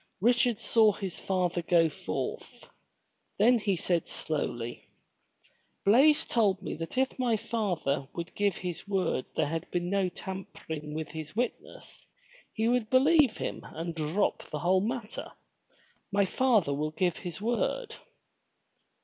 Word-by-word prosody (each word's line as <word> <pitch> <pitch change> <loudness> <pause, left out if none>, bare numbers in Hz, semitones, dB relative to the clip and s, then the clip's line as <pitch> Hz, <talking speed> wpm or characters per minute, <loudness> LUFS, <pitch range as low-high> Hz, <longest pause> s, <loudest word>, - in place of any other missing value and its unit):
Richard 240 +1 +3
saw 220 -3 +4
his 190 -3 -5
father 180 -2 0
go 170 -1 +4
forth. 155 - -5 0.7
Then 235 +4 +5
he 205 -3 +1
said 170 -1 0
slowly: 120 -6 -4 1.0
Blaize 290 +9 +6
told 205 -5 +2
me 190 - -5
that 165 +7 -6
if 265 0 +1
my 240 -3 +2
father 175 - -1
would 170 0 -6
give 205 -3 +1
his 180 0 -5
word 190 -9 0
there 155 - +2
had 165 +3 -3
been 175 0 -2
no 195 -2 +2
tampering 160 -6 -7
with 160 -1 -4
his 155 +1 -7
witnesses, 250 - -4 0.4
he 220 0 0
would 240 -2 +1
believe 280 +1 +5
him - - -4
and 165 +1 -5
drop 165 +5 0
the 150 - -3
whole 185 +5 +3
matter. 230 +1 -4 0.8
My 200 0 +3
father 215 - +2
will 150 +2 -1
give 175 +2 0
his 175 -3 -6
word." 245 - -1
190 Hz, 140 wpm, -29 LUFS, 165-230 Hz, 1.0 s, Blaize